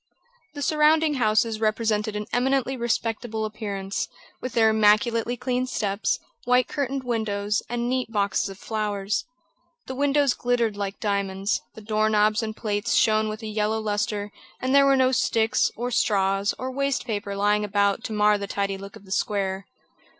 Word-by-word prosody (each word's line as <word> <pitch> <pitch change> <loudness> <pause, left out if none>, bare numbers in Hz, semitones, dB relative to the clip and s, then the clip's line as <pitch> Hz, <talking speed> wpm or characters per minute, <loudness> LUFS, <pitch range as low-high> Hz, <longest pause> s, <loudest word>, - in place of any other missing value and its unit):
The 285 - -4
surrounding 310 +1 +3
houses 220 -3 +1
represented 215 -1 0
an 210 0 -3
eminently 265 +1 +1
respectable 230 -2 -2
appearance, 200 -2 -4 0.3
with 255 -1 -5
their 225 -2 +4
immaculately 225 +3 +3
clean 255 +1 -1
steps, 200 -4 -1 0.3
white 250 0 +3
curtained 275 -2 -2
windows, 210 -4 -1
and 240 0 -2
neat 255 -2 -1
boxes 200 -2 0
of 195 - -9
flowers. 205 -2 -2 0.6
The 260 - -5
windows 280 0 +2
glittered 240 -3 0
like 200 -1 -4
diamonds, 200 -1 -1
the 220 - -10
door 215 0 +1
knobs 215 +1 +3
and 220 -1 -5
plates 210 +1 -1
shone 215 0 +3
with 215 +1 -6
a - - -4
yellow 215 +1 0
lustre, 210 -1 -2 0.3
and 255 +1 -1
there 280 0 +6
were 275 -1 +5
no 260 0 +4
sticks, 230 -1 +2
or 245 +2 -3
straws, 195 -3 +1
or 260 0 -4
waste 275 -1 -1
paper 205 -4 -3
lying 205 +1 +2
about 200 -1 +1
to - - -4
mar 210 0 +3
the 200 - -4
tidy 195 -1 -2
look 200 0 -10
of 200 - -14
the 190 - -14
square. 195 -1 -1
215 Hz, 165 wpm, -25 LUFS, 205-245 Hz, 0.6 s, there